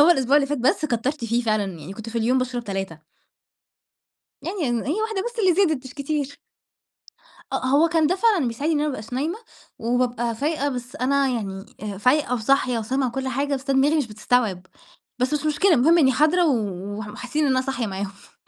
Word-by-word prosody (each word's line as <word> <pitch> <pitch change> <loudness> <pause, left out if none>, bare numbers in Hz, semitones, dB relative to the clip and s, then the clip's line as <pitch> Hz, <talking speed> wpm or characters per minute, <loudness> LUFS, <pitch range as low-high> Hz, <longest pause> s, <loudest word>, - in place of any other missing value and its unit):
هو 315 +4 +7
الأسبوع 270 -3 +4
اللي 280 -2 +3
فات 290 0 -2
بس 255 +5 +2
كتَرت 250 +1 -1
فيه 235 +2 0
فعلًا، 215 -2 +1
يعني 155 +6 -8
كنت 220 +2 -8
في 230 +1 -2
اليوم 250 +4 +2
باشرب 250 -2 -2
3. 195 -5 -4 1.4
يعني 340 -10 -2
إن 240 -1 -1
هي 315 +11 -1
واحدة 440 -3 -1
بس 480 -1 -6
اللي 370 -5 +4
زادت 315 -9 +2
مش 260 - -11
كتير. 285 -1 -3 1.1
أ - - -2
آه، 255 - -3
هو 290 +5 +4
كان 325 -2 +3
ده 360 - +2
فعلًا 385 - +3
بيساعدني 290 +8 -1
إن 290 - +1
أنا 300 - +1
ما 275 - -2
ابقاش 220 +1 -9
نايمة 315 - -2 0.4
وبابقى 240 0 0
فايقة 290 +3 -1
بس 250 -2 -6
أنا 275 +2 +2
يعني 195 -5 -4 0.2
آآ، 205 -2 -5
فايقة 255 +2 +2
وصاحية 250 +1 +1
وسامعة 255 +3 -1
كل 265 +2 -3
حاجة 280 +3 -1
بس 275 +1 -4
أنا 270 - +3
دماغي 290 +4 +3
مش 285 -6 +1
بتستوعب 210 -3 0 0.5
بس 255 +4 0
مش 295 - -2
مشكلة 345 +6 +3
المهم 320 +7 +5
إنّي 265 -4 +5
حاضرة 330 +5 +3
و 290 - +3 0.4
ومح 210 -1 -6
وحاسّين 250 +8 -2
إن 280 - +2
أنا 255 0 +3
صاحية 255 -3 -2
معاهم. 195 0 -7
260 Hz, 210 wpm, -23 LUFS, 235-300 Hz, 1.4 s, هو